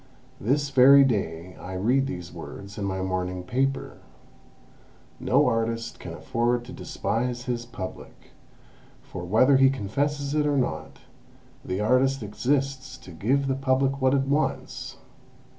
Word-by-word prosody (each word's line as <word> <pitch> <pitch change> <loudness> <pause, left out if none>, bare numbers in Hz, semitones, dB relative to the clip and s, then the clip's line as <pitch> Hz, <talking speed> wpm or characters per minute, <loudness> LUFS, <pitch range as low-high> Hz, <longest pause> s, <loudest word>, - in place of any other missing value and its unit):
This 140 +6 0
very 140 +1 +8
day 90 -8 -2
I 90 - -8
read 125 +9 +1
these 90 -8 -6
words 100 +1 -9
in 100 - -2
my 95 -1 -2
morning 90 -1 -2
paper: 135 +7 -1 1.2
'No 140 +5 +3
artist 115 -1 -1
can - - -8
afford 120 +1 -1
to 130 - -9
despise 120 +2 -2
his 120 -2 -3
Public, 100 -6 -9 0.7
for, 85 - -8
whether 115 +9 +4
he 135 0 +6
confesses 140 +5 -2
it 150 -1 +2
or 145 -1 +1
not, 130 - -3 0.6
the 95 +2 -3
artist 130 +3 +2
exists 130 +5 -1
to 90 - -13
give 130 +12 0
the 135 - +1
Public 135 0 +1
what 130 +1 +4
it 135 - +3
wants.' 145 +2 -2
125 Hz, 140 wpm, -26 LUFS, 100-135 Hz, 1.2 s, very